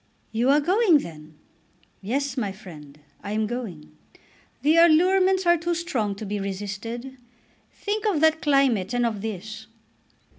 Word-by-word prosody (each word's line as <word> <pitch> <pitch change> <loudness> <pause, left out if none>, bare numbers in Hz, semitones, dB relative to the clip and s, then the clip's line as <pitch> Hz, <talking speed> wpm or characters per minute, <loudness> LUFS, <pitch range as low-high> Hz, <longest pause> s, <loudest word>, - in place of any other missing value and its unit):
"You 235 +4 +1
are 285 +2 +5
going 365 +2 +4
then?" 155 - -9 0.6
"Yes, 265 +6 -2
my 210 -6 -2
friend; 150 -7 -13 0.2
I 205 - -4
am 215 0 0
going. 210 -10 -7 0.7
The 310 +3 +4
allurements 370 +3 +4
are 345 0 +5
too 340 +1 -1
strong 240 - -2
to 215 - -7
be 205 +1 -3
resisted. 205 +6 -6 0.5
Think 425 +1 -3
of 380 -8 +1
that 320 0 +3
climate 260 -8 +2
and 245 0 +1
of 215 -4 -2
this." 215 +1 -6
240 Hz, 145 wpm, -24 LUFS, 200-320 Hz, 0.7 s, are